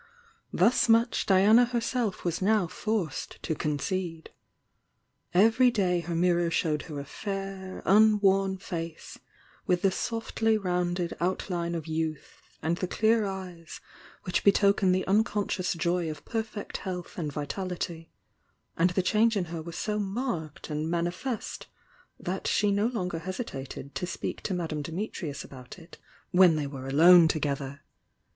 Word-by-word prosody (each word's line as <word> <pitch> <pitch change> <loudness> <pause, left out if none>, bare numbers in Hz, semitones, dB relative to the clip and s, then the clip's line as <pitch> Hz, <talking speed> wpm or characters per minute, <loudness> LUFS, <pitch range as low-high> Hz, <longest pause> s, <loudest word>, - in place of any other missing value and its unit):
Thus 230 +6 +3
much 230 +1 +3
Diana 205 +5 +6
herseli 240 -3 -1
was 170 0 -1
now 210 0 +3
forced 205 0 -3
to 160 - -1
concede. 165 +3 -3 1.0
Every 225 +7 +5
day 185 -6 +1
her 170 0 -4
mirror 175 0 +2
showed 155 -2 0
her 145 -2 -5
a 140 - -6
fair, 195 +3 -6
unworn 195 -2 +4
face, 165 -3 -6 0.5
with 180 -1 +1
the 195 - +4
softly 225 +1 0
rounded 180 -2 -1
outline 175 -1 -1
of 160 -2 -4
youth, 160 -2 -5
and 165 +2 0
the 185 - -2
clear 220 +2 +2
eyes 185 -4 -7 0.4
which 180 - -1
betoken 200 -1 +4
the 185 +1 +1
unconscious 205 -2 +1
joy 170 0 0
of 155 -1 -8
perfect 220 -2 -4
health 180 -2 -6
and 150 -3 -2
vitality, 165 +2 -4 0.7
and 175 +2 +3
the 180 +1 0
change 220 +3 +3
in 185 - 0
her 165 - -4
was 165 +1 -8
so 210 -1 -1
marked 195 - -4
and 155 +1 -2
manifest 175 +8 -3 0.5
that 185 +2 -3
she 210 -1 +2
no 205 +2 +2
longer 180 -8 -3
hesitated 160 - -6
to 180 - -3
speak 180 - -4
to 190 - -2
Madame 160 -4 -3
Dimitrius 165 -2 -5
about 125 +2 -11
it 170 -1 -14 0.3
when 180 -3 +6
they 150 -2 -1
were 135 -2 -7
alone 165 +5 +7
together. 140 -3 -2
180 Hz, 140 wpm, -28 LUFS, 165-205 Hz, 1.0 s, alone